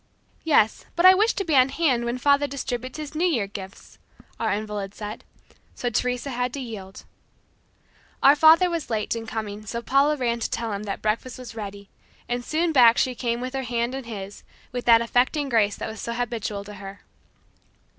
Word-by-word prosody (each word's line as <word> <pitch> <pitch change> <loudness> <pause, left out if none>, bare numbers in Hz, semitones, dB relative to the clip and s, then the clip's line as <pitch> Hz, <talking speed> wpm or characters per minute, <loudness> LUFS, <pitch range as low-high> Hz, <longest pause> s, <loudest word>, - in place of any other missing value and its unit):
"Yes, 255 -9 +2
but 345 +1 +2
I 370 - +10
wish 430 +5 +3
to 390 - -2
be 315 -3 +1
on 260 0 +6
hand 265 -6 +1
when 240 +1 -2
father 285 +2 +3
distributes 255 -2 -5
his 305 -1 -7
New 335 +4 +1
Year 245 - +1
gifts," 195 -1 -10 0.4
our - - 0
invalid 210 -1 -4
said. 210 +1 -7 0.5
So 245 - -2
Teresa 250 +4 -1
had 250 0 -1
to 280 - -4
yield. 210 -7 -8 1.2
Our 280 +2 +8
father 320 +4 +6
was 335 -4 -3
late 220 -1 -1
in 225 -1 -6
coming 215 -2 -5
so 235 +3 -4
Paula 280 +4 +3
ran 235 -3 -1
to - - -2
tell 230 -2 -3
him 200 +1 -5
that 200 - -5
breakfast 225 +4 -1
was 250 -2 -9
ready, 200 -2 -7 0.4
and 245 0 -2
soon 325 +5 0
back 240 -5 +6
she 255 - +1
came 235 -1 -2
with 255 +1 -5
her 270 - -2
hand 240 0 -2
in 270 -2 -5
his, 205 -3 -7 0.3
with 245 -1 -4
that 230 -1 +6
affecting 260 +5 +1
grace 215 -4 +2
that - - -5
was 220 0 -7
so 235 - -4
habitual 230 -4 -3
to 210 +1 -10
her. 195 0 -10
240 Hz, 195 wpm, -24 LUFS, 215-275 Hz, 1.2 s, I